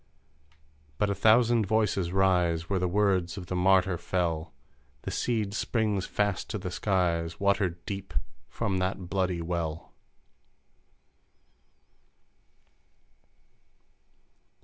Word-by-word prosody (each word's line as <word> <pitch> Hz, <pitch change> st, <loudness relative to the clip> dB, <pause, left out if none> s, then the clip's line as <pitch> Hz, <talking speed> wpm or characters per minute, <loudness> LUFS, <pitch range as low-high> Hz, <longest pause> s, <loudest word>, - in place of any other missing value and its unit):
But 105 Hz, -1 st, +1 dB
a -, -, +2 dB
thousand 110 Hz, +2 st, +4 dB
voices 105 Hz, -5 st, +1 dB
rise 90 Hz, -3 st, +2 dB
Where 95 Hz, -2 st, 0 dB
the 90 Hz, -, 0 dB
words 95 Hz, -2 st, +1 dB
of 90 Hz, -, -6 dB
the 90 Hz, -, -4 dB
martyr 95 Hz, -1 st, +3 dB
fell; 85 Hz, -2 st, -1 dB, 0.5 s
The -, -, -4 dB
seed 110 Hz, -4 st, -1 dB
springs 105 Hz, -4 st, 0 dB
fast 105 Hz, -2 st, -1 dB
to -, -, -2 dB
the 90 Hz, -2 st, -5 dB
Skies 85 Hz, -4 st, 0 dB
Watered 95 Hz, -4 st, 0 dB
deep 95 Hz, -4 st, -6 dB, 0.3 s
from 100 Hz, -1 st, -1 dB
that 95 Hz, -1 st, -3 dB
bloody 90 Hz, -3 st, 0 dB
well 85 Hz, -1 st, -4 dB
95 Hz, 100 wpm, -28 LUFS, 85-100 Hz, 0.5 s, thousand